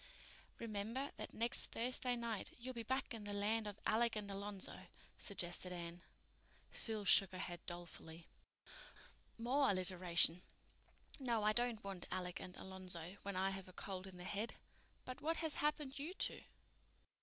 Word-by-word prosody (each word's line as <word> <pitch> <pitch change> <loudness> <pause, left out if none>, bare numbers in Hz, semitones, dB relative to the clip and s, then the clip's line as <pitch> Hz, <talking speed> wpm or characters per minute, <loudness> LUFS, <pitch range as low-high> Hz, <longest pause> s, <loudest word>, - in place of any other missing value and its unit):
"Remember 230 +5 -2
that - - -5
next 235 +2 +4
Thursday 250 +1 0
night, 235 -4 -2
you'll 255 +1 -5
be 235 - -3
back 260 +3 -1
in 225 -2 -5
the 205 0 -2
land 215 +2 +1
of 205 0 -6
Alec 230 +1 +3
and 205 -2 -3
Alonzo," 200 0 -4 0.3
suggested 180 -2 -1
Anne. 170 0 -5 0.7
Phil 220 -3 -4
shook 195 -1 +8
her - - -4
head 175 -2 -4
dolefully. 170 -1 -6 1.1
"More 265 +5 +3
alliteration. 180 -2 +6 0.8
No, 235 -5 +1
I 215 0 +5
don't 240 -1 +1
want 195 -3 -5
Alec 180 -1 -2
and 180 - -8
Alonzo 185 -1 -4
when 200 -1 -4
I 190 +1 +2
have 195 -1 -6
a 185 - -12
cold 190 0 -5
in 185 -1 -10
the 180 - -7
head. 205 +5 -2 0.5
But 255 - -6
what 325 +2 +1
has 320 -2 -1
happened 295 -2 0
you 325 +7 -4
two? - - +1
205 Hz, 155 wpm, -40 LUFS, 185-235 Hz, 1.1 s, shook